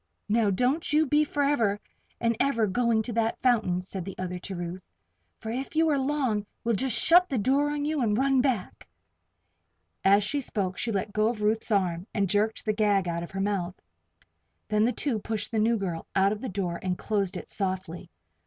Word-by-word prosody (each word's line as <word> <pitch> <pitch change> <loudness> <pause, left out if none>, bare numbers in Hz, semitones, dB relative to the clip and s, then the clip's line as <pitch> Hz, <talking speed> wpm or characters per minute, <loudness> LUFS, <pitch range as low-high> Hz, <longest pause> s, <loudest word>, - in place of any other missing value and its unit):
"Now, 220 0 +3
don't 250 - 0
you 305 +1 +4
be 295 +2 +3
forever 280 -9 +1 0.4
and 230 -1 +1
ever 250 -5 +2
going 230 +2 +1
to 235 - -5
that 225 0 0
fountain," 215 -8 +2
said 185 0 -6
the 195 +1 -8
other 180 -1 -4
to 190 +1 -7
Ruth. 175 +1 -5 0.6
"For 220 - -6
if 265 +6 -5
you 320 0 +3
are 290 - +2
long, 260 -7 0 0.2
we'll 235 - +1
just 250 +3 +1
shut 360 +2 +5
the 270 - -1
door 275 +7 +2
on 295 0 -2
you 305 -1 0
and 215 -3 +1
run 270 0 +3
back." 250 -8 -2 1.2
As 200 +1 +5
she 280 +8 -1
spoke 195 -8 -2
she 235 - -1
let 200 0 -2
go 215 0 +2
of 225 -2 -2
Ruth's 220 +3 +1
arm 185 -3 0
and 200 -2 +2
jerked 210 +3 0
the 215 - +1
gag 205 -3 +2
out 170 0 -2
of 170 - -6
her 195 - -4
mouth. 195 -3 -2 0.9
Then 210 0 +3
the 245 - +2
two 250 -4 -1
pushed 215 0 -4
the 225 - 0
new 230 +2 +3
girl 180 -5 -4
out 195 +1 +4
of 210 0 -4
the 260 - -4
door 180 -3 -3
and 185 -1 -2
closed 200 -3 -1
it - - -8
softly. 185 -3 -3
215 Hz, 205 wpm, -27 LUFS, 195-255 Hz, 1.2 s, shut